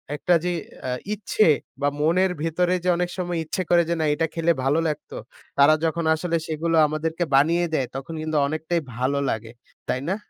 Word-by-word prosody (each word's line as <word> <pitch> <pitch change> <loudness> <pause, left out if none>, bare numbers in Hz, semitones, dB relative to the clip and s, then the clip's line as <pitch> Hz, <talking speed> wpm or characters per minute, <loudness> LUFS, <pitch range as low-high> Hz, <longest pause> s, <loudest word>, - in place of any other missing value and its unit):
একটা 175 +4 +1
যে 180 - 0 0.4
আ - - -1 0.2
ইচ্ছে, 215 0 +1 0.3
বা 145 - +2
মনের 180 +5 +3
ভিতরে 175 +2 +1
যে 180 - +1
অনেক 175 0 -1
সময় 175 -2 -2
ইচ্ছে 160 +4 -3
করে 175 -1 +5
যে - - +2
না 155 - +1
এটা 165 +2 0
খেলে 165 0 +2
ভালো 140 +4 +2
লাগতো। 150 - -5 0.4
তারা 140 +2 +7
যখন 165 +1 -1
আসলে 170 +1 -2
সেগুলো 165 +1 -1
আমাদেরকে 160 +3 -2
বানিয়ে 165 +5 +4
দেয়, 135 -5 +1
তখন 135 +4 -6
কিন্তু 155 -1 -1
অনেকটাই 160 +3 -1
ভালো 130 +4 0
লাগে। 115 0 -3 0.4
তাই 130 - 0
না? 190 - +1
165 Hz, 185 wpm, -24 LUFS, 150-175 Hz, 0.4 s, তারা